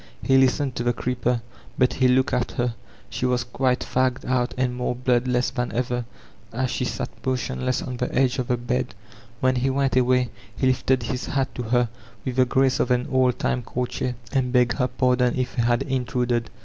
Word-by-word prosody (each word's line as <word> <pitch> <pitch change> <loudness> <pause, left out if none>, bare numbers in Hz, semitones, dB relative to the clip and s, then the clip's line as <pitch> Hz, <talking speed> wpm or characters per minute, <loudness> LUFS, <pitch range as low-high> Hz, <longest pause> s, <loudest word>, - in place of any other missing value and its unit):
He 135 - +3
listened 135 +1 +2
to 120 - -1
the 120 0 +2
creeper, 125 -1 -1 0.3
but 125 -1 +3
he 130 - +3
looked 130 +2 +3
at 125 -1 0
her; 120 -1 0 0.4
she 125 - -1
was 125 -1 +1
quite 125 +1 0
fagged 130 0 0
out 125 -1 0
and 125 -1 +1
more 125 0 -1
blood 125 0 +1
less 125 0 +1
than 125 -2 -2
ever 120 0 -1 0.5
as 130 +2 -1
she 125 - -1
sat - - -3 0.2
motionless 130 -1 -1
on 125 -1 -5
the 125 - -2
edge 130 0 +2
of 125 - -1
the 125 - +1
bed. 125 +1 -2 0.5
When 130 0 +3
he 130 +2 +1
went 135 0 +1
away 125 -1 +3 0.3
he - - 0
lifted 130 0 +2
his 125 +2 -3
hat 135 -1 -1
to - - -4
her 120 +1 +2 0.4
with 130 -1 -3
the 130 - +5
grace 130 +1 +2
of - - +1
an 125 0 +1
old 130 -2 +3
time 125 - 0
courtier, 125 +1 -3 0.2
and 130 -2 +1
begged 125 0 +2
her 125 - +3
pardon 125 -1 +2
if 130 -1 -1
he 120 - 0
had 120 0 +2
intruded. 125 -3 -1
125 Hz, 205 wpm, -24 LUFS, 125-130 Hz, 0.5 s, the